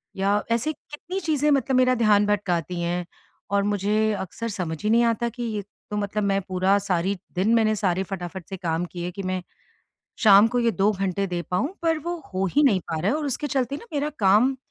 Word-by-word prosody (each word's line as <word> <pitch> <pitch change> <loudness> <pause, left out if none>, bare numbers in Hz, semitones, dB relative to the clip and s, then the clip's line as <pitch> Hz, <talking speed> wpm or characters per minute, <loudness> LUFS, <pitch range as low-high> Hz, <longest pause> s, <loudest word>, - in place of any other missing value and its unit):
या 200 +2 +1
ऐसे 235 +7 +1
कितनी 310 +6 -7
चीज़ें 300 -4 +1
मतलब 270 -1 +2
मेरा 255 0 +4
ध्यान 210 -3 +4
भटकाती 180 -4 -1
हैं 175 +1 -1 0.5
और 200 0 +2
मुझे 205 +2 +1
अक्सर 230 +5 -5
समझ 170 -6 -4
ही 210 - +1
नहीं 235 +1 +4
आता 235 0 +1
कि 240 +1 -7
ये 215 -3 -2 0.3
तो 210 - -2
मतलब 205 +1 -1
मैं 195 0 +1
पूरा 185 +1 +1
सारी 190 0 0 0.2
दिन 200 +6 +2
मैंने 215 -1 +3
सारे 190 -3 0
फ़टाफ़ट 185 -2 -6
से 190 - -5
काम 170 0 -1
किए 175 0 -4
कि 195 +2 -7
मैं 185 -1 -2 0.8
शाम 205 0 +8
को 245 +1 0
ये 235 -1 +2
2 205 0 +2
घंटे 195 -1 -1
दे 175 -1 -2
पाऊँ। 275 - 0
पर 325 -1 +2
वो 345 +3 -4 0.2
हो 190 +1 0
ही 295 - +5
नहीं 220 -10 +4
पा 160 -1 -2
रहा 180 +6 +1
है 300 - 0
और 305 - -3
उसके 285 +2 -2
चलते 270 -2 -1
ना 465 - -12
मेरा 290 +1 0
काम 215 +7 +4
205 Hz, 215 wpm, -24 LUFS, 185-240 Hz, 0.8 s, शाम